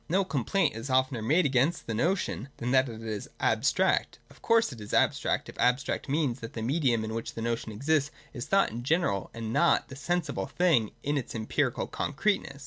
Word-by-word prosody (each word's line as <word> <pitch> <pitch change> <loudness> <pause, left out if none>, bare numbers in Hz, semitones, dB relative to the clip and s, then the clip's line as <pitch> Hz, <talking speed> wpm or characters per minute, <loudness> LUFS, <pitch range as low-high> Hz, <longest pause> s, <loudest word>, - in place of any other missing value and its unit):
No 190 +3 +2
complaint 150 - 0
is 115 +4 -6
oftener 130 -2 +1
made 155 +11 +3
against 140 +5 +1
the 115 - -3
notion 160 - -1
than 120 +1 -2
that 130 -1 +4
it 115 -1 -8
is 110 -2 -5
abstract. - - +1
Of - - -19
course 230 -6 +3
it 115 - -11
is 105 - -4
abstract, - - +1
if - - -10
abstract 125 +3 +1
means 140 -4 0
that 115 -1 -8
the 110 - -4
medium 125 -3 +1
in 110 0 -4
which 115 0 -5
the 115 - -5
notion 115 -1 -2
exists 140 +6 +1 0.2
is 120 -3 -5
thought 195 0 +3
in 115 +2 -5
general 135 - 0
and 115 -1 -5
not - - +3
the 130 - -8
sensible 160 +1 -2
thing 160 - +2
in 145 0 0
its 125 - -7
empirical 110 -1 -1
concreteness. 150 -2 -1
130 Hz, 200 wpm, -28 LUFS, 115-155 Hz, 0.2 s, that